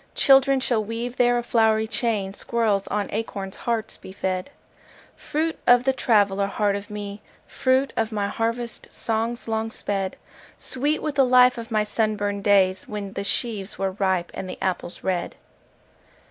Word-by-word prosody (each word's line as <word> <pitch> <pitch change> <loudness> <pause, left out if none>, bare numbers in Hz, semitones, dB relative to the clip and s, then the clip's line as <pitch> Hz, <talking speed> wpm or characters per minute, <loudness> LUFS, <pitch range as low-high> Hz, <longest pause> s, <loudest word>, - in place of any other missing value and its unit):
Children 270 -1 +5
shall 235 -4 +1
weave 230 +3 -5
there 245 0 +4
a 240 - -1
flowery 220 -2 +3
chain, 215 -4 -1
Squirrels 215 -3 0
on 205 -1 -1
acorn 200 -3 -4
hearts 225 +2 -3
be - - -11
fed:— 185 0 -3 0.7
Fruit 320 +2 -2
of 245 0 +6
the 265 0 +2
traveller 200 -6 +2
heart 200 0 0
of 200 0 -6
me, 205 0 -6 0.2
Fruit 260 +1 +1
of 225 0 0
my 205 -2 -1
harvest 230 +2 -3
songs 230 +2 -2
long 220 0 -1
sped: 195 -3 -3 0.4
Sweet 290 +4 -2
with 305 - -1
the 275 -1 +4
life 250 -1 +5
of 230 +1 -8
my 215 -2 +2
sunburned 210 -2 -1
days 190 -2 +3
When 205 -2 -5
the 200 - -3
sheaves 205 -1 -1
were 195 0 -1
ripe, 185 -2 0
and 185 - -6
the - - -6
apples 185 -2 -3
red. 180 -2 -2
220 Hz, 160 wpm, -24 LUFS, 200-240 Hz, 0.7 s, of